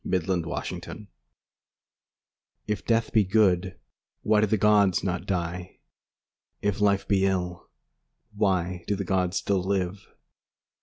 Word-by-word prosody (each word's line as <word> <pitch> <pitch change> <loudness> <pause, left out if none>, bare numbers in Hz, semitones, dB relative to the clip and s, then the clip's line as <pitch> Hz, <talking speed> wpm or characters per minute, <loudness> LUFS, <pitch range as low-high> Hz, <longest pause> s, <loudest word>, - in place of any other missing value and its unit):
LXXIV 90 -2 -3 1.6
If 105 -2 -3
death 115 -1 +1
be 110 - +5
good, 95 -2 +2 0.5
Why 105 0 +3
do 110 - +3
the 110 - +1
gods 105 -3 +3
not 90 -2 -3
die? 90 -1 -3 0.8
If 105 0 -1
life 100 -1 +2
be 100 -2 +2
ill, 90 -2 -3 0.6
Why 90 -4 0
do 100 - +1
the 100 0 -4
gods 90 0 0
still 100 -2 0
live? 95 0 -2
95 Hz, 115 wpm, -26 LUFS, 90-105 Hz, 1.6 s, be